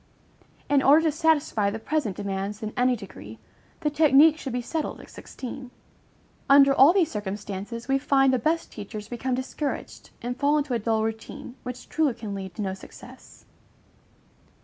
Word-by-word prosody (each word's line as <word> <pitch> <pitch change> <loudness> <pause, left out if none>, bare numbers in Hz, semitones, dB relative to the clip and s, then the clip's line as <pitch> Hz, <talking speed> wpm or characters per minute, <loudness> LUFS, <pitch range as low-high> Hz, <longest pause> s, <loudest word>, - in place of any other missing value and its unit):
In 285 -1 +3
order 295 +4 +6
to 320 - +2
satisfy 295 -9 +1
the 210 - -4
present 225 -4 -2
demands 200 +2 -4
in 215 - -4
any 250 0 +2
degree, 110 - -10 0.4
the 300 -2 0
technique 300 +1 +6
should 280 -4 -6
be 250 - -1
settled 315 +5 -3
at - - -13
sixteen. 255 0 -8 0.8
Under 275 0 +7
all 275 +4 +7
these 355 -4 +2
circumstances, 205 +2 -5
we 270 0 +2
find 270 -1 +3
the 255 - +2
best 320 +7 -1
teachers 210 0 -8
become 250 +2 -2
discouraged, 265 +3 -5
and 245 +1 -3
fall 290 +1 +3
into 290 -3 -1
a 235 - +1
dull 220 0 0
routine, 225 +4 -5
which 250 -1 -8
truly 300 -6 +1
can 220 -3 -6
lead 190 -2 -7
to 210 - -3
no 190 -1 -2
success. 190 - -14
250 Hz, 170 wpm, -25 LUFS, 210-285 Hz, 0.8 s, Under